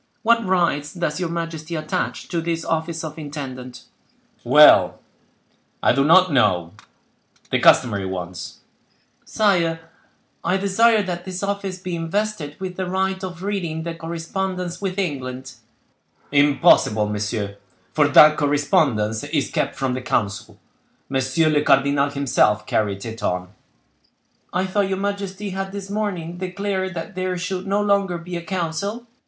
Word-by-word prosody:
What 230 0 +4
rights 170 -6 0
does 170 -2 -2
your 180 -2 -2
majesty 165 -1 -4
attach 155 -1 -3
to 170 -2 -1
this 165 0 -2
office 165 0 -2
of 155 0 -7
intendant?" 130 -4 -7 0.6
"Well—I - - +3
do 135 +2 +2
not 180 +2 +5
know—the 90 -10 -2
customary 100 -6 +4
ones." 90 -1 -6 0.6
"Sire, 175 -6 +1 0.6
I 190 - +1
desire 210 +3 +3
that 175 -2 -5
this 185 0 -5
office 200 -2 -3
be 180 -1 -5
invested 165 -2 -2
with 185 -1 -6
the 185 -1 -3
right 190 0 -1
of 180 -1 -6
reading 175 -6 -3
the 170 0 -4
correspondence 175 +2 -4
with 190 -1 -3
England." 130 -7 -3 0.8
"Impossible, 140 -7 +4
monsieur, 105 -1 -3 0.4
for 150 -2 +4
that 150 +1 +7
correspondence 140 - +1
is 145 -1 -1
kept - - -1
from 135 -2 -1
the 130 - -3
council; 115 -2 -2 0.5
monsieur 135 +4 +1
le 150 -1 +3
cardinal 140 0 +3
himself 130 -7 +1
carried 100 -2 -1
it 115 0 -7
on." 90 0 -2 1.0
"I 185 +2 0
thought 195 +1 0
your 190 - -1
majesty 200 0 -3
had 195 +1 -4
this 200 0 -7
morning 180 -5 -3
declared 190 0 -3
that 170 +6 -6
there 185 0 -2
should 185 +1 -4
no 200 +1 +1
longer 200 -3 +1
be 175 +1 -7
a 170 - -3
council?" 190 +6 -3
165 Hz, 135 wpm, -22 LUFS, 140-190 Hz, 1.0 s, that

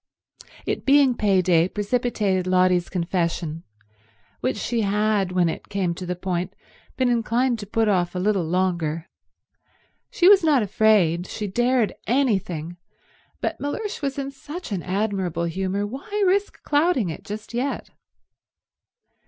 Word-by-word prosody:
It - - -2
being 275 -2 +5
pay 200 -5 +2
day 175 -1 +3
precipitated 205 -4 0
Lotty's 185 -1 +3
confession, 170 -2 -2 0.8
which - - -1
she 230 +2 -1
had, 205 -2 +1
when 180 -2 +2
it 160 - -5
came 190 -4 -1
to 180 +1 -7
the 180 - -2
point, 180 0 -3 0.4
been 260 - +2
inclined 240 +1 +1
to 205 - -7
put 225 +1 +1
off 180 -3 +1
a - - -1
little 195 0 +1
longer. 170 -2 -1 1.0
She 355 - +3
was 390 -2 +7
not 290 -7 +4
afraid, 190 -5 +3
she 210 - -5
dared 240 +3 +1
anything, 190 - 0 0.6
but - - -2
Mellersh 395 +9 -4
was 275 -1 -2
in 275 0 -3
such 295 +3 -8
an 190 -3 -2
admirable 190 -3 -1
humour—why 205 - -2
risk 395 +2 0
clouding 290 - +2
it - - -9
just 210 +3 -7
yet? 260 +4 -3
205 Hz, 135 wpm, -23 LUFS, 180-245 Hz, 1.0 s, was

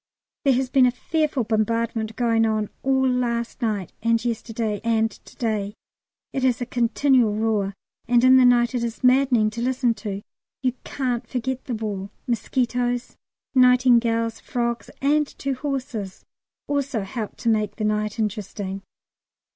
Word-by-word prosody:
There 275 - +5
has 255 0 -1
been 260 -2 +5
a 245 0 -2
fearful 305 -5 +1
bombardment 225 0 -1
going 230 -2 +2
on 215 -2 0
all 265 0 +2
last 240 -1 -1
night 210 -6 -2
and 230 +1 +1
yesterday 225 -2 -2
and 225 -1 +2
to - - -17
day; 210 -3 -2 0.6
it 265 - -2
is 255 -2 +2
a 245 - -2
continual 245 -1 +2
roar, 210 -3 0 0.3
and 240 0 +4
in 260 0 +7
the 260 - +6
night 240 -1 +4
is 235 -1 -3
maddening 250 -4 +4
to 235 +2 -5
listen 250 -1 +1
to; 205 -3 -6 0.4
you 255 -2 +2
can't 250 -3 -2
forget 260 +1 -3
the 245 - -3
war. 205 -3 -4 0.2
Mosquitoes, 245 0 -1 0.4
nightingales, 240 -3 +4
frogs, 235 -1 -2
and 295 +1 +3
two 275 0 -2
horses 255 -8 -4 0.4
also 280 -5 -1
helped 215 +2 -5
to 235 - +1
make 215 -2 +1
the 215 - -2
night 210 0 -1
interesting. 205 -2 -3
235 Hz, 145 wpm, -23 LUFS, 220-255 Hz, 0.6 s, in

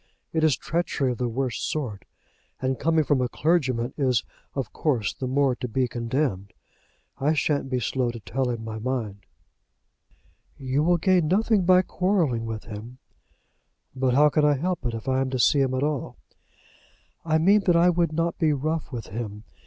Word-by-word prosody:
It 160 -1 +1
is 155 -4 +3
treachery 155 -6 -1
of 120 - -5
the 125 - 0
worst 125 +1 -2
sort, 120 -11 -4 0.5
and 130 0 -1
coming 160 +1 +2
from 145 -3 +1
a 125 - 0
clergyman 130 -8 0
is 130 -5 +2 0.3
of 135 -6 -3
course 120 - 0
the 130 - -5
more 135 0 +2
to 125 - -4
be 125 +2 0
condemned. 115 -5 -2 0.7
I 145 +3 +2
shan't 145 -2 0
be 130 -1 0
slow 125 0 -1
to 120 0 -6
tell 125 +5 -2
him 115 -2 -3
my 110 -1 -5
mind." 110 -5 -4 1.3
"You 135 +1 -1
will 175 +3 +3
gain 180 -1 +2
nothing 205 +2 +2
by 185 0 +6
quarrelling 170 - 0
with 110 -1 -5
him." 115 +3 -9 1.0
"But 130 -1 +1
how 150 +2 +6
can 150 +1 +1
I 150 -1 +4
help 180 +5 -2
it, 115 - -3
if 115 +3 -8
I 130 0 +2
am 135 - -1
to 130 - -2
see 140 +3 +4
him 130 -1 +1
at 130 - 0
all?" 145 -3 -2 1.1
"I 160 -1 +2
mean 195 +6 +4
that 175 - +5
I 175 +1 +5
would 170 -2 +1
not 165 +1 -1
be 155 -2 +3
rough 155 +3 -2
with 120 -4 -6
him. 105 0 -6
135 Hz, 185 wpm, -25 LUFS, 120-160 Hz, 1.3 s, by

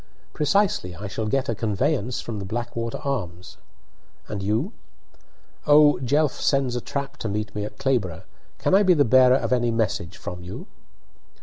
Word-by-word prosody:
"Precisely. 150 - +1
I 100 +5 -8
shall 110 +3 -3
get 135 +4 0
a 115 - 0
conveyance 120 +3 -1
from 110 -3 -5
the - - -5
'Blackwater 115 +2 -4
Arms.' 90 -10 -4 0.7
And 105 -2 -4
you?" 110 - -1 0.9
'Oh, 150 0 +6
Jelf 145 +3 +1
sends 135 -3 +1
a 120 - -2
trap 140 +3 -5
to 110 - -4
meet 105 +1 -3
me 105 0 -3
at 105 - -9
Clayborbough! 110 -12 -1 0.3
Can - - 0
I 195 - +7
be 185 -3 +5
the 145 -2 +4
bearer 130 +1 +6
of 130 - -1
any 120 -1 +2
message 110 -5 -1
from 90 0 -7
you?" 90 - -8
120 Hz, 170 wpm, -24 LUFS, 105-140 Hz, 0.9 s, I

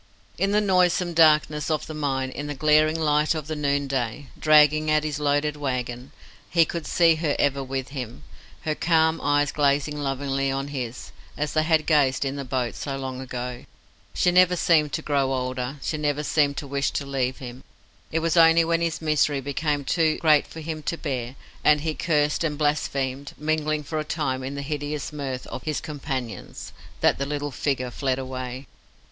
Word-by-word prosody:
In 195 - +2
the 210 +1 +3
noisome 180 -3 +2
darkness 155 -2 +4
of 155 -2 0
the 155 - -7
mine, 135 -3 -2
in 145 +2 -5
the 145 - -4
glaring 155 +2 +3
light 150 0 +2
of 155 -2 -4
the 155 +1 -4
noonday 140 -3 -1
dragging 155 0 +5
at 155 0 +3
his 150 -2 -3
loaded 145 +1 +1
wagon, 125 -2 -4 0.4
he 165 -2 +4
could 170 0 -5
see 170 -2 +4
her 155 -2 0
ever 140 -1 +1
with 135 0 -4
him, 125 - -7 0.4
her 155 - -1
calm 160 0 +2
eyes 145 0 +2
gazing 145 0 +1
lovingly 135 -1 -1
on 135 +1 -2
his, 125 -4 -5 0.3
as 150 +1 -2
they 155 - +3
had 155 -1 +2
gazed 140 -4 +3
in 135 +1 -2
the 140 - -4
boat 125 -2 -2
so 135 -2 -4
long 130 -1 -5
ago. 125 -1 -6 0.5
She 180 - +3
never 180 0 +5
seemed 155 -4 +3
to - - -2
grow 140 -2 +1
older, 130 +1 -3
she 155 - -2
never 150 0 -1
seemed 145 -2 +1
to - - -4
wish 140 0 0
to 140 - -2
leave 130 -2 -1
him. 125 0 -9 0.5
It 160 - 0
was 165 - +1
only 165 0 +6
when 165 0 +1
his 165 -1 -2
misery 150 -2 +2
became 145 +1 -2
too 160 +1 +2
great 155 -3 +4
for 160 - -9
him 155 0 -5
to 165 +3 -3
bear, 130 -5 -4 0.3
and 150 -1 +5
he 160 0 -1
cursed 150 -1 +1
and 150 -3 -1
blasphemed, 140 -2 -1
mingling 155 0 -1
for 155 +1 -3
a - - -1
time 135 -4 -2
in 135 +2 -5
the 140 - -4
hideous 145 0 -4
mirth 135 -3 -4
of - - -7
his 155 -2 -2
companions, 135 - -6 0.3
that - - +3
the 140 - -1
little 145 0 -3
figure 130 -2 -2
fled 130 0 -1
away. 130 0 -5
145 Hz, 190 wpm, -24 LUFS, 135-155 Hz, 0.5 s, only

